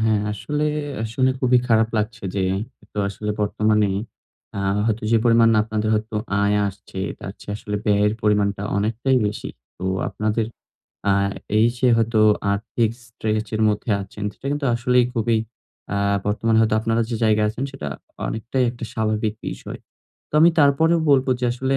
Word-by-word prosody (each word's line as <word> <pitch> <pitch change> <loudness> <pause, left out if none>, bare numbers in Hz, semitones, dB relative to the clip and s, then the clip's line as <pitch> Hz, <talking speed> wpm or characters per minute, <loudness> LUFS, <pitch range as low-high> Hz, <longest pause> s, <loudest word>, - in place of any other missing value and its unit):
হ্যাঁ 110 -2 +2
আসলে, 150 +8 -2 0.4
আ - - -1
শুনে 130 0 +3
খুবই 125 -1 +4
খারাপ 110 -1 +4
লাগছে 110 0 -2
যে 95 - 0 0.4
একতো 105 0 -10
আসলে 105 +2 -4
বর্তমানে 105 0 +2 0.7
আ - - -1 0.3
হয়তো 110 +1 0
যে - - +6
পরিমাণ 115 -1 +5
আপনাদের 110 0 -2
হয়তো 110 0 -2 0.3
আয় 100 0 +3
আসছে, 95 -1 -10 0.2
তার 95 - -7
চেয়ে 105 - -5
আসলে 105 -1 -4
ব্যয়ের 105 0 +3
পরিমাণটা 100 -1 +1
অনেকটাই 115 +6 +1
বেশি। 105 - -4 0.3
তো 95 - -6 0.2
আপনাদের 110 +1 -1 0.6
আ - - +5 0.5
এইযে 120 +3 +3
হয়তো 115 -1 +2 0.3
আর্থিক 110 +2 0 0.2
স্ট্রেচের 110 -1 -2
মধ্যে 105 +2 -1
আছেন। 100 +1 -8
সেটা - - -10
কিন্তু 145 -1 -1
আসলেই 125 +1 +3
খুবই 115 0 +1 0.6
আ - - 0 0.3
বর্তমানে 110 +2 +2
হয়তো 110 0 +2
আপনারা 115 +1 +1
যে 115 - -2
জায়গায় 105 -1 +3
আছেন 125 +5 -4
সেটা 105 - -5 0.4
অনেকটাই 115 +4 -2
একটা 120 -1 -8
স্বাভাবিক 110 0 -1
বিষয়। - - -7 0.5
তো - - -13
আমি 170 - +7
তারপরেও 160 +4 +4
বলবো 135 -1 +4
যে, - - 0
আসলে 130 +2 0
110 Hz, 155 wpm, -22 LUFS, 105-120 Hz, 0.7 s, আমি